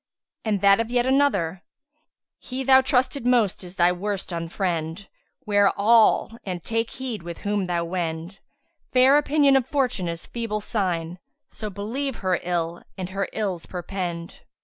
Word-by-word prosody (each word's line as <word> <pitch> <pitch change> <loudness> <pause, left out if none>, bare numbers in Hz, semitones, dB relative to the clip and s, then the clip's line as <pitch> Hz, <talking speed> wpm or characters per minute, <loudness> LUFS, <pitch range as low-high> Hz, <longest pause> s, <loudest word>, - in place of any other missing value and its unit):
And 210 -4 0
that 200 +1 +6
of 230 0 -1
yet 245 0 +1
another,[FN#161] 205 - +2 0.9
'He 260 +1 -3
thou 265 0 +6
trusted 260 -1 +1
most 230 -7 +2
is 180 +1 -8
thy 175 0 +4
worst 195 +1 -3
unfriend; 170 +1 -3 0.2
* - - -44
'Ware 205 -1 +4
all 225 +1 +4
and 180 -3 -5
take 225 0 -1
heed 250 -6 -5
with 170 0 -8
whom 205 -1 0
thou 170 -1 -1
wend: 170 +1 -4 0.5
Fair 265 +3 +6
opinion 285 -1 +3
of 265 -2 +2
Fortune 255 - 0
is 170 0 -4
feeble 230 -3 -3
sign; 180 -5 -2 0.2
* - - -56
So 215 - -6
believe 230 +7 -3
her 185 -4 0
ill 170 -1 -2 0.2
and 185 -1 -4
her 195 0 -2
Ills 195 -6 -3
perpend!'" 175 -2 -5
200 Hz, 160 wpm, -24 LUFS, 175-240 Hz, 0.9 s, that